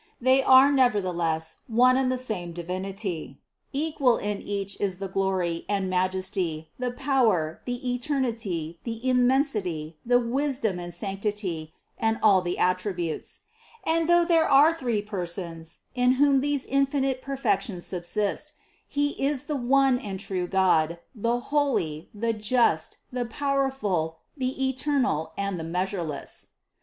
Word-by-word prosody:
They 260 +2 +4
are 265 +1 +7
nevertheless 180 - +1
one 250 +2 +5
and 260 -1 +2
the 255 - 0
same 210 -9 -4
Divinity, 180 -3 -4 0.3
equal 285 -4 +2
in 205 0 -3
Each 200 -1 -3
is 190 -3 0
the 195 +1 -4
glory, 190 -3 -1
and 195 -2 0
majesty, 185 -3 -1
the 250 0 -1
power, 240 - +1
the 245 0 -2
eternity, 230 - -2
the 230 +1 -4
immensity, 245 - +1
the 245 +1 +4
wisdom 245 -4 0
and 175 0 -6
sanc 195 0 -5
tity, 185 -7 -3 0.3
and 225 0 +1
all 200 -4 +6
the 175 0 -3
attributes. 180 -3 -1 0.4
And 330 0 +1
though 345 0 +5
there 330 -2 +3
are 290 +4 +7
three 240 -9 -1
Persons, 170 -4 -4
in 250 0 +3
whom 275 0 +4
these 285 -1 -1
infinite 275 -1 +1
perfections 260 -8 -1
subsist, 190 +3 -2 0.3
He 290 0 +1
is 280 -1 +1
the 295 0 -3
one 265 0 +3
and 195 -6 -5
true 185 -3 -3
God, 170 -3 +2 0.2
the 235 +1 0
Holy, 250 - 0
the 230 +2 -1
Just, 215 -6 +1
the 250 -1 -2
Power 275 +3 0
ful, 180 -11 -2 0.2
the 265 -1 -1
Eternal 265 - 0
and 200 -3 -2
the - - -4
Measureless. 175 -2 -3
28. - - -29
215 Hz, 140 wpm, -26 LUFS, 180-265 Hz, 0.4 s, are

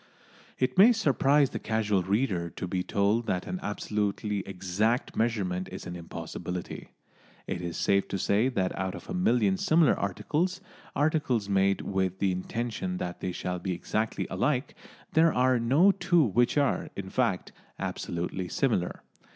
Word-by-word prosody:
It 130 +5 0
may 230 +5 +9
surprise 140 - +3
the - - -4
casual 105 -3 0
reader 95 -3 0
to 90 - -6
be 90 +1 -1
told 100 +5 +1
that 90 -1 -1
an 185 0 -4
absolutely 105 0 -2
exact 100 +6 -1
measurement 95 -6 -1
is 95 - -7
an 90 - -6
impossibility. 90 +1 -6 0.6
It 90 - -4
is 85 -1 -4
safe 100 0 +2
to - - -2
say 105 +6 +2
that 95 -8 -1
out 95 0 -3
of - - -9
a - - -2
million 120 - +2
similar 160 - +4
articles 150 - -1 0.4
articles 145 -8 +1
made 100 0 +2
with 95 -1 -1
the 95 -1 +1
intention 120 - -3
that 90 - -4
they 95 - -3
shall 90 0 -3
be 95 0 -2
exactly 110 +5 -2
alike 130 +1 0 0.4
there 165 +1 +5
are 130 -1 +3
no 140 +12 +5
two 175 -4 +3
which 120 +3 +2
are, 145 -2 +1
in - - -6
fact, - - 0 0.3
absolutely 90 +2 -3
similar. 110 -6 -1
105 Hz, 155 wpm, -28 LUFS, 95-135 Hz, 0.6 s, may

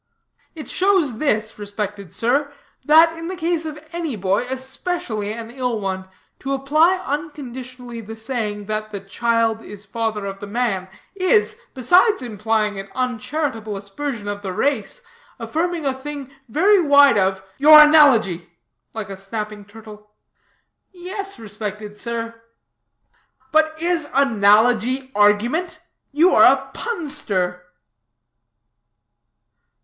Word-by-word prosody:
"It 310 - -8
shows 365 - +1
this, 215 -7 -1
respected 205 -3 -5
sir, 260 +9 0 0.3
that 325 +3 +6
in 330 0 -7
the 375 - -4
case 335 -1 -1
of 305 -1 -6 0.2
any 330 -7 -3
boy, 195 +3 0
especially 260 - -4
an 230 +1 -7
ill 250 -3 -2
one, 190 -1 -4 0.3
to 270 +1 -3
apply 305 +7 +3
unconditionally 255 -5 -6
the 225 +1 -9
saying, 220 -3 -3
that 215 +1 -3
the 205 -2 -6
'child 225 +2 0
is 205 -1 -10
father 220 -1 -3
of 195 0 -6
the 205 - -8
man', 205 -4 -1 0.3
is, 400 +3 +2 0.2
besides 360 - +4
implying 215 -2 -1
an 195 0 -8
uncharitable 250 -3 -3
aspersion 205 +3 -6
of 205 0 -4
the 190 -2 -5
race, 280 - -1 0.3
affirming 335 0 -2
a 270 - +1
thing 275 0 -8 0.2
very 380 - +4
wide 285 -6 +6
of 190 0 0
" 190 - -30
" - - -35
Your 305 +2 +9
analogy," 245 - +5 0.5
like 210 -3 -5
a - - -5
snapping 210 +1 -6
turtle. 210 0 -14 0.8
"Yes, 380 - -7
respected 210 -1 -7
sir." 230 +1 -5 1.1
"But 315 0 +2
is 335 -2 0
analogy 245 +1 +3
argument? 215 - +2 0.3
You 320 +6 +4
are - - +6
a - - -2
punster." 205 - -3
235 Hz, 125 wpm, -21 LUFS, 210-300 Hz, 1.1 s, Your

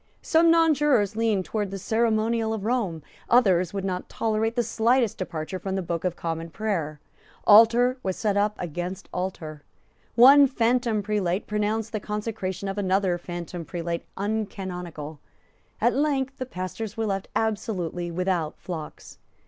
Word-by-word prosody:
Some 330 +1 +4
nonjurors 295 - +3
leaned 220 -4 +1
towards 210 -3 -2
the 195 - -5
ceremonial 220 +2 +1
of 205 -2 -6
Rome; 210 - -1 0.3
others 185 -8 +4
would 195 -1 -3
not 185 -1 -3
tolerate 225 0 -1
the 240 - +2
slightest 230 +1 +1
departure 175 0 -4
from 190 +1 -3
the 190 - -1
Book 170 -1 -3
of 180 -2 -1
Common 165 0 -4
Prayer. 165 -6 -3 0.5
Altar 235 +4 +6
was 190 -4 -2
set 210 -2 0
up 210 +1 +1
against 175 +3 -5
altar. 165 -5 -4 0.5
One 275 +4 +8
phantom 235 -3 +1
prelate 200 -2 -1
pronounced 210 +1 -1
the 215 - -2
consecration 205 -2 -4
of 195 +1 -3
another 190 -2 +1
phantom 175 0 -6
prelate 170 +2 -4
uncanonical. 180 -7 -4 0.6
At 240 +3 +3
length 275 -2 0
the 255 - -4
pastors 205 +2 -5
were 225 - 0
left 195 -2 -2
absolutely 190 -6 -2
without 175 -2 -1
flocks. 160 -4 -8
205 Hz, 145 wpm, -25 LUFS, 180-225 Hz, 0.6 s, One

